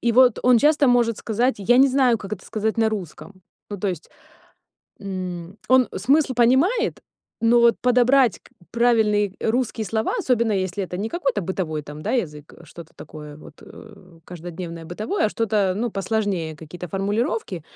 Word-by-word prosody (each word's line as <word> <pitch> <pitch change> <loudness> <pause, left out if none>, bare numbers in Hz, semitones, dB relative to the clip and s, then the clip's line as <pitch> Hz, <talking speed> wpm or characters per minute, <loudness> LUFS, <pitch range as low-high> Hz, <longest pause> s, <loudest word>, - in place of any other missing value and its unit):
и 235 - +1
вот 250 -1 +5
он 250 -1 +5
часто 290 -1 +3
может 235 -3 +2
сказать: 240 +4 0
"Я 240 +5 +3
не 275 +1 +6
знаю, 255 -4 +2
как 200 +1 -9
это 190 - -6
сказать 220 +1 -2
на 220 -1 +3
русском". 190 -1 -7 0.3
Ну, 205 - -4
то 200 - -1
есть, 175 -4 -6 0.9
м, 185 -2 -6
он 255 -1 +4
смысл 270 +6 +2
понимает, 275 - +2 0.4
но 235 +1 +4
вот 235 0 +4
подобрать 250 -1 +3
к - - -21 0.2
правильные 220 -4 +2
русские 225 -1 -1
слова, 220 - -1
особенно 235 - +1
если 190 0 -2
это 180 - -6
не 205 +4 -3
какой-то 270 - -1
бытовой 165 -4 -3
там, 150 +1 -10
да, - - -2
язык, 150 - -3
что-то 165 0 -13
такое 150 -1 -10
вот, 155 - -14
э, 185 -6 -15
каждодневное 170 -1 -8
бытовое, 215 - -1
а - - 0
что-то, 205 -4 0
ну, 235 +1 -2
посложнее, 195 -6 -2
какие-то 175 +3 -9
формулировки, 200 - -2
215 Hz, 165 wpm, -22 LUFS, 180-245 Hz, 0.9 s, не